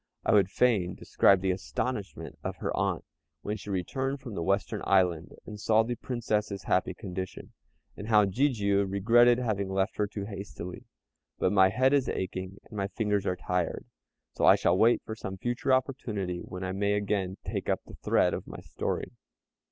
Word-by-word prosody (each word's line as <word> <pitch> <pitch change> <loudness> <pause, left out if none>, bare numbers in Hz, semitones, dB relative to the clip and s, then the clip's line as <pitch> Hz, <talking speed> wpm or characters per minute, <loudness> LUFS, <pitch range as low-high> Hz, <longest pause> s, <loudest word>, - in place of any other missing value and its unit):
I - - +3
would 100 -3 +5
fain 100 -6 +2
describe 95 -2 +3
the 95 -1 +1
astonishment 100 +3 -4
of - - -3
her - - -3
aunt - - -1 0.4
when 105 - -2
she 105 -1 -9
returned 130 +9 -2
from 125 -4 -8
the 85 - -3
Western 100 +4 0
Island 90 -4 +2
and 105 -1 -8
saw 110 +1 +3
the 120 +2 -2
Princess's 105 -5 -2
happy 95 0 +1
condition, 95 -2 -6 0.4
and 105 - -7
how 105 -2 +5
Jijiu 100 -3 +1
regretted 120 +5 +5
having 105 -6 -1
left 95 +2 -1
her 105 - +1
too 100 -1 -5
hastily; 100 -3 -7 0.5
but - - +1
my 95 -2 +6
head 130 +6 +3
is 140 -2 +2
aching 95 +1 -4
and 110 - -13
my 100 -1 -1
fingers 105 -2 -1
are 90 - +1
tired, 90 -2 -2 0.5
so - - -3
I - - +8
shall - - +2
wait 115 +5 +4
for 110 - -5
some 95 -3 -6
future 120 +6 -1
opportunity 110 -9 -1
when 90 +1 -7
I 95 - -2
may 100 +2 0
again 100 -2 -1
take - - -3
up - - +1
the - - -13
thread - - +2
of - - -5
my - - -8
story. - - -3
100 Hz, 185 wpm, -29 LUFS, 95-115 Hz, 0.5 s, I